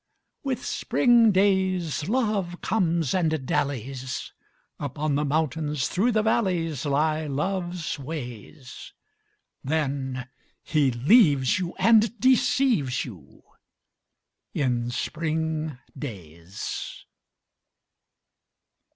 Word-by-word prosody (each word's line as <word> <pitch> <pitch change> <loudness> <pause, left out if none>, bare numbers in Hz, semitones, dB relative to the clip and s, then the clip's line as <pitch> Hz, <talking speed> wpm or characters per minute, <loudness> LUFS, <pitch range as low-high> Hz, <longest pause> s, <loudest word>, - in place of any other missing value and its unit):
With 270 -3 -3
spring 235 -3 +4
days 185 -6 +1
Love 210 -7 0
comes 170 - +1
and 160 -6 0
dallies: 135 -2 -3 0.5
Upon 145 +1 -2
the 145 +1 +1
mountains, 150 -1 0
through 220 +7 +1
the 215 0 +2
valleys 175 - 0
Lie 155 +2 +1
Love's 175 +2 -2
ways. 130 -2 -8 0.7
Then 135 -3 -2 0.4
he 145 -3 +2
leaves 140 - +4
you 175 -2 -4
and 225 0 +4
deceives 250 - +2
you - - -13 1.1
In 125 -4 0
spring 155 +2 -2 0.2
days. 90 - -7
155 Hz, 80 wpm, -25 LUFS, 135-190 Hz, 1.1 s, spring